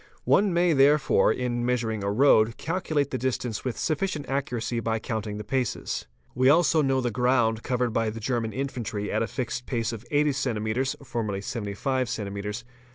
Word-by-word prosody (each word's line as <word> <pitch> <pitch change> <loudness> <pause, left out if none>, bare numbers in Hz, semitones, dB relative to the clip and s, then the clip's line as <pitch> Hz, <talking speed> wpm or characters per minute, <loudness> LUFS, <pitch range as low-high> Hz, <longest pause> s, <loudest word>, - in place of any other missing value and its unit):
One 200 -1 +4
may 175 0 +3
therefore 140 +1 +4
in 120 -1 -1
measuring 115 -4 -1
a 100 - 0
road 110 -2 +4
calculate 155 -5 -1
the 130 - -2
distance 125 -3 -2
with 125 -3 -3
sufficient 155 -2 -1
accuracy 125 -4 -2
by 115 0 -1
_ - - -25
counting 110 -3 -3
the 105 - -5
paces. 125 - -2 0.3
We 130 +2 +4
also 160 +1 +4
know 135 -2 +2
the 120 -1 -1
ground 125 -3 +2
covered 125 -2 -1
by 115 -1 +1
the 110 +1 -6
German 115 0 -1
i - - -12
infantry 120 -6 -3
at - - 0
a 115 - 0
fixed 125 0 -4
pace 115 -1 -1
of 115 -1 -7
80 150 0 +3
cms. 125 -1 -1
(formerly 115 -5 -2
75 120 +5 -2
cms.) 105 0 -4
125 Hz, 180 wpm, -26 LUFS, 110-135 Hz, 0.3 s, One